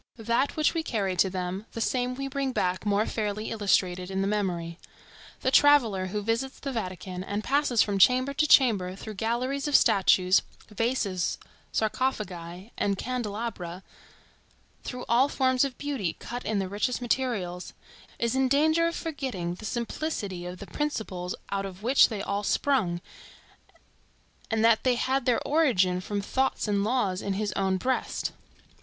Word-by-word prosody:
That 235 +4 0
which 310 -1 +2
we 330 - 0
carry 200 -10 -1
to 190 - +4
them, 185 +2 -4
the - - -5
same 250 +2 0
we 275 +1 -4
bring 275 -1 -2
back 185 0 -1
more 205 +1 +2
fairly 215 -1 -3
illustrated 185 -4 +1
in 190 0 -1
the 195 - 0
memory. 180 -5 -2 0.6
The 260 - +1
traveller 240 -11 +5
who 210 +2 -3
visits 230 +5 -2
the 275 - -4
Vatican, 185 -5 -5
and 205 +2 -3
passes 275 -4 +3
from 200 -2 -2
chamber 255 +6 +4
to 305 +2 +2
chamber 205 -11 +4
through 215 +2 -8
galleries 245 +7 -1
of 290 - +1
statues, 185 -1 +5 0.3
vases, 210 -4 -1 0.3
sarcophagi 205 -5 -2
and 200 -1 +1
candelabra, 210 -7 -4 1.0
through 250 -1 -6
all 250 +4 +4
forms 260 -2 +2
of 270 -3 -3
beauty 270 - -2
cut 245 +1 -7
in 215 - 0
the 195 -1 -1
richest 210 +6 -1
materials, 230 -8 -2 0.4
is 235 -1 0
in 265 0 +3
danger 315 +5 +3
of 335 - -3
forgetting 260 - -3
the 200 +5 -9
simplicity 220 - -3
of 180 +1 -7
the 200 - -8
principles 200 -11 -3 0.2
out 200 0 -1
of 190 +1 -11
which 260 +4 +5
they 210 -4 -4
all 200 0 -1
sprung, 200 -9 +1 1.5
and 225 0 +2
that 230 -1 +4
they 255 -1 +3
had 260 +1 0
their 245 - +1
origin 195 - +3
from 205 +2 -3
thoughts 265 +4 0
and 200 -1 +1
laws 205 -5 0
in 200 - -2
his 205 +1 -1
own 190 -1 +1
breast. 255 +7 -1
220 Hz, 160 wpm, -27 LUFS, 190-260 Hz, 1.5 s, traveller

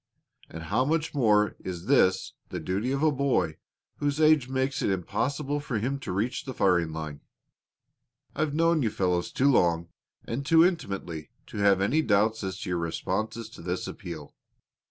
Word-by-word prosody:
And 80 0 -8
how 105 +10 +1
much 155 +3 0
more 105 -6 +3
is 90 -1 -6
this 115 -7 +3 0.2
the - - -4
duty 100 +8 -2
of 140 +2 -1
a 155 - +5
boy 125 - 0 0.4
whose 145 0 -1
age 155 -5 +4
makes 130 +1 -1
it - - +1
impossible 135 - -1
for 135 -5 -3
him 130 +6 -1
to - - -5
reach 110 +7 -1
the 130 -3 -6
firing 85 -4 +2
line. 75 -2 -6 1.1
I've 150 -1 -1
known 165 0 +3
you 115 - +2
fellows 90 -3 0
too 140 +2 +3
long 85 -7 +2 0.4
and 120 +4 -3
too 165 +4 +6
intimately 95 - -3 0.2
to - - -9
have 100 -1 +4
any 130 +11 +2
doubts 110 -2 +2
as 95 -1 -4
to 95 - -5
your 90 - 0
responses 110 +7 -3
to - - -12
this 90 +2 -3
appeal. 80 -5 -8
110 Hz, 175 wpm, -27 LUFS, 90-140 Hz, 1.1 s, too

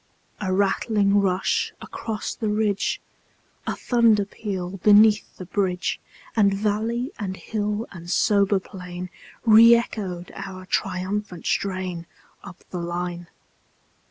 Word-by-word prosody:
A 190 -3 -2
rattling 200 +1 +2
rush 185 -1 0
across 220 -2 -5
the 220 - -3
ridge, 210 -1 0 0.7
A - - -1
thunder 230 -4 +3
peal 195 -3 -5
beneath 210 +2 +5
the 185 - -7
bridge; 180 0 -1 0.4
And 200 -3 +4
valley 220 +5 -1
and 190 -3 -4
hill 210 0 -2
and 170 -2 -10
sober 200 +1 +3
plain 180 -1 -8 0.3
Re 230 +1 +9
echoed 190 -7 -3
our 185 -1 -8
triumphant 185 0 -2
strain, 185 -3 -2 0.4
Up 190 -3 -12
the 180 - -3
line. 175 0 -4
200 Hz, 115 wpm, -24 LUFS, 185-210 Hz, 0.7 s, Re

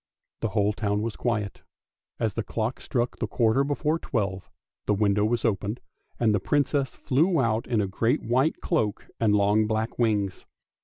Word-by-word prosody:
The - - 0
whole 105 -1 +1
town 105 -1 -1
was 115 -1 -3
quiet. 105 -5 -2 0.6
As 110 -3 0
the 115 - -1
clock 115 +3 -3
struck 120 -1 -2
the - - -1
quarter 115 +2 +2
before 150 +3 0
twelve 100 - -2 0.4
the 105 - +3
window 105 0 +2
was 115 +2 0
opened, 105 +1 -1 0.4
and 110 -3 +3
the 105 - +2
Princess 140 +4 0
flew 155 +5 +2
out 115 -2 +1
in 115 -4 +1
a 100 - 0
great 115 +5 0
white 130 +7 +1
cloak 110 - 0
and 105 -2 +3
long 105 +1 +3
black 110 +2 -2
wings. 105 -5 0
110 Hz, 170 wpm, -26 LUFS, 105-125 Hz, 0.6 s, the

